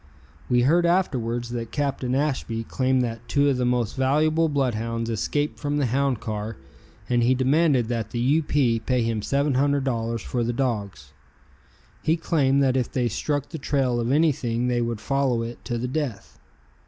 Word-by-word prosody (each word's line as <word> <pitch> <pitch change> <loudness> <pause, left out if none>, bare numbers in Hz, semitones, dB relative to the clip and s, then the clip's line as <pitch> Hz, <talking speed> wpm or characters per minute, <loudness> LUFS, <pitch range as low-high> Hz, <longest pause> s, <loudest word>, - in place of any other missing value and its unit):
We 125 0 +3
heard 170 +6 +4
afterwards 120 -10 0
that 115 -2 -4
Captain 135 -3 -1
Ashby 130 -5 -1
claimed 130 +2 +1
that 115 0 -5
two 145 0 +2
of 135 - +1
the 125 - 0
most 125 -3 0
valuable 155 +5 +2
blood 135 -4 +1
hounds 115 +1 -3
escaped 115 - -1
from 145 0 -1
the 145 - +1
hound 130 0 0
car 110 0 -5 0.5
and 120 -1 +2
he 125 +2 +3
demanded 135 -1 +2
that 115 -3 -2
the 120 - -5
U. 135 +7 +3
P. 130 -6 +1
pay 125 +2 0
him 115 -2 -1
$700 135 -4 0
for 120 +1 -2
the 120 +1 -1
dogs. 105 - -3 0.9
He 160 +2 +1
claimed 140 -4 +2
that 130 -1 +2
if 125 -3 0
they 125 -2 0
struck 145 +6 -2
the 160 - -6
trail 135 -3 0
of 120 +1 -1
anything 140 -6 +1
they 120 -1 +1
would 115 -2 -2
follow 130 0 0
it 115 +1 -7
to 120 -2 -2
the 120 +2 -2
death. 130 -7 -4
125 Hz, 180 wpm, -24 LUFS, 115-140 Hz, 0.9 s, heard